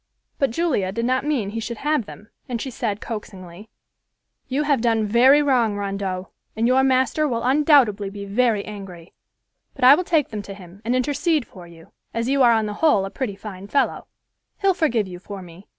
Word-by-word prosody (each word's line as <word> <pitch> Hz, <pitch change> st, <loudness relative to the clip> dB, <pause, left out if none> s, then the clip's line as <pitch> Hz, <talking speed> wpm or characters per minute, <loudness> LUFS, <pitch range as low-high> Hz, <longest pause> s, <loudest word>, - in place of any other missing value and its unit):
But 275 Hz, -, +2 dB
Julia 240 Hz, -, 0 dB
did 230 Hz, +4 st, -2 dB
not 255 Hz, +2 st, 0 dB
mean 240 Hz, -10 st, -1 dB
he 225 Hz, -, -4 dB
should 230 Hz, +1 st, -5 dB
have 295 Hz, -5 st, -1 dB
them, 215 Hz, -, -12 dB, 0.2 s
and 240 Hz, -2 st, -2 dB
she 265 Hz, -, -5 dB
said, 220 Hz, -4 st, -3 dB
coaxingly, 195 Hz, -3 st, -8 dB, 0.8 s
"You 275 Hz, +3 st, -1 dB
have 285 Hz, -5 st, +1 dB
done 225 Hz, -2 st, +1 dB
very 255 Hz, +7 st, +5 dB
wrong, 245 Hz, -7 st, +2 dB
Rondeau, 195 Hz, -2 st, -4 dB, 0.3 s
and 225 Hz, +1 st, 0 dB
your 260 Hz, +1 st, +4 dB
master 265 Hz, +3 st, +2 dB
will 235 Hz, -4 st, -2 dB
undoubtedly 260 Hz, -7 st, +3 dB
be 200 Hz, 0 st, -8 dB
very 215 Hz, 0 st, +1 dB
angry, 190 Hz, -5 st, -10 dB, 0.6 s
but 275 Hz, -, -6 dB
I 255 Hz, +2 st, +10 dB
will 345 Hz, +5 st, +2 dB
take 320 Hz, -5 st, +1 dB
them 215 Hz, -2 st, -5 dB
to 200 Hz, -1 st, -9 dB
him 185 Hz, 0 st, -14 dB
and 240 Hz, +3 st, 0 dB
intercede 290 Hz, +3 st, 0 dB
for 180 Hz, -3 st, -13 dB
you, 165 Hz, -1 st, -16 dB, 0.2 s
as 230 Hz, +1 st, -1 dB
you 275 Hz, 0 st, +2 dB
are 240 Hz, -2 st, +6 dB
on 220 Hz, -1 st, +1 dB
the 210 Hz, -, -4 dB
whole 295 Hz, -12 st, +4 dB
a 195 Hz, -, -7 dB
pretty 235 Hz, -7 st, -4 dB
fine 200 Hz, -1 st, -9 dB
fellow. 280 Hz, -, 0 dB, 0.5 s
He'll 390 Hz, -1 st, +3 dB
forgive 240 Hz, -, 0 dB
you 180 Hz, -1 st, -9 dB
for 195 Hz, 0 st, -9 dB
me. 175 Hz, +3 st, -14 dB
230 Hz, 200 wpm, -22 LUFS, 200-265 Hz, 0.8 s, I